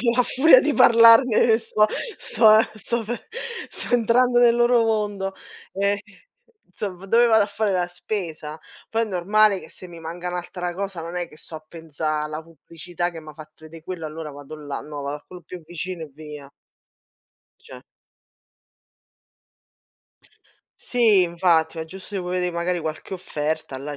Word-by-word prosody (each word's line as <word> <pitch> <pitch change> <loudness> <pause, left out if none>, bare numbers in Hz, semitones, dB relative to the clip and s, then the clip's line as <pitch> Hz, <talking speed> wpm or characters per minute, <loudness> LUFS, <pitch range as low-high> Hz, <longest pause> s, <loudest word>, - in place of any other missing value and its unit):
a - - -7
fu 235 +1 +2
a - - +6
furia 265 +2 +6
di 295 +1 0
parlarne 230 -1 +6
sto 215 -2 +2 0.3
sto 215 -2 +5
ehm, 220 - +2
sto 230 +3 -3
pe 240 +3 -6 0.4
sto 245 - -3
entrando 245 +1 +3
nel 240 -1 +5
loro 240 0 +4
mondo. 205 -3 -1 0.4
Ehm, 200 +1 +1 0.8
insomma 195 -3 -6
dove 230 +5 +4
vado 220 -3 +5
a - - -6
fare 215 0 -1
la 180 -1 0
spesa. 170 -4 -6 0.3
Poi 225 0 +1
è - - +2
normale 205 +1 +2
che - - -13
se 185 - -11
mi 170 -2 -12
manca 170 +2 -6
un'altra 180 0 -5
cosa 195 -2 -5
non 165 +2 -7
è 175 -1 -3
che - - -17
sto 160 - -13
a 155 - -12
pensa' 155 -2 -4
alla 155 +1 -5
pubblicità 165 +2 -6
che 165 - -9
m'ha 155 -1 -11
fatto 155 0 -14
vedè 160 +1 -12
quello, 175 -3 -5
allora 155 0 -7
vado 145 +2 -10
là, 145 -2 -6
no 150 -1 -8
vado 140 +1 -4
a 150 - -18
quello 180 -1 -12
più 180 -2 -9
vicino 175 +1 -6
e 150 - -14
via. 150 -1 -11 1.1
Cioè - - -13 3.0
Sì, 220 -6 +3
infatti, 170 -2 +1
è 160 - -3
giusto 190 +4 -9
che 190 - -1
vuoi 180 0 -5
vedè 180 0 -1
magari 175 +1 -2
qualche 160 +4 -5
offerta, 155 -5 -4
là 145 +2 -6
180 Hz, 175 wpm, -23 LUFS, 160-215 Hz, 3.0 s, a